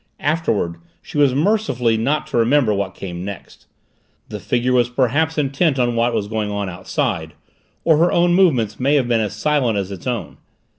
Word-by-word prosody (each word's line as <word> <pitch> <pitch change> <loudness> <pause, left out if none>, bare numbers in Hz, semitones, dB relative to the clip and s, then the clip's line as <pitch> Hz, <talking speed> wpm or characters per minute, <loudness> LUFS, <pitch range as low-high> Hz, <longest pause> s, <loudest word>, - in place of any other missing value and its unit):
Afterward 145 - 0 0.3
she 150 - -5
was 140 -3 +4
mercifully 140 - +1
not 140 +8 0
to - - -3
remember 120 -1 +3
what 100 -1 -3
came 90 -2 -6
next; 100 -2 -9 0.6
the - - -6
figure 125 +1 0
was 120 -1 +3
perhaps 140 +6 0
intent 145 +1 +1
on 120 -2 +1
what 120 +1 +2
was 110 -3 -2
going 110 -1 -2
on 100 -1 -3
outside, 85 -3 -3 0.5
or 160 -2 +4
her 170 +2 +3
own 175 0 +3
movements 140 - +2
may 140 +3 +2
have 135 -4 +2
been 115 -2 +2
as 105 -2 -3
silent 125 -2 +1
as 100 -1 -3
its 95 +2 -8
own. 120 -3 -4
120 Hz, 185 wpm, -19 LUFS, 105-145 Hz, 0.6 s, was